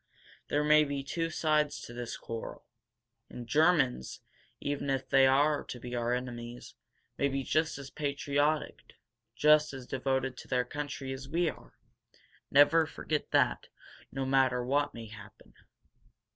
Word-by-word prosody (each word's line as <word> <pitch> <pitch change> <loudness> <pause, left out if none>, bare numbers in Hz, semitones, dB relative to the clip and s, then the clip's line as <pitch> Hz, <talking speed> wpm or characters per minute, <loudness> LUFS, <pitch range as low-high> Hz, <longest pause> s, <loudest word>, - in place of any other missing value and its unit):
There 145 +1 +1
may 150 0 +6
be 140 -1 -3
two 165 +4 -2
sides 155 -2 +1
to 120 - -9
this 120 -1 -5
quarrel. 115 -1 -7 0.6
And 120 - -8
Germans, 150 - +2 0.4
even 145 -1 -3
if 135 -1 -1
they 135 -1 +5
are 145 +2 +3
to 125 - -7
be 125 +1 -8
our 120 0 -1
enemies, 120 -1 -7 0.5
may 140 - +3
be 135 0 -2
just 155 +4 0
as 140 -1 -9
patriotic, 145 +1 -1 0.4
just 150 +2 +4
as 130 -2 -8
devoted 130 0 -1
to - - -10
their 125 -1 +1
country, 145 0 -5
as 135 +1 -8
we 170 +2 +1
are. - - -18 0.7
Never 155 +3 +5
forget 155 -1 -3
that, - - +2 0.4
no 135 0 -3
matter 130 -2 +2
what 145 +3 0
may 115 -1 -7
happen." 105 -2 -14
135 Hz, 145 wpm, -30 LUFS, 125-150 Hz, 0.7 s, may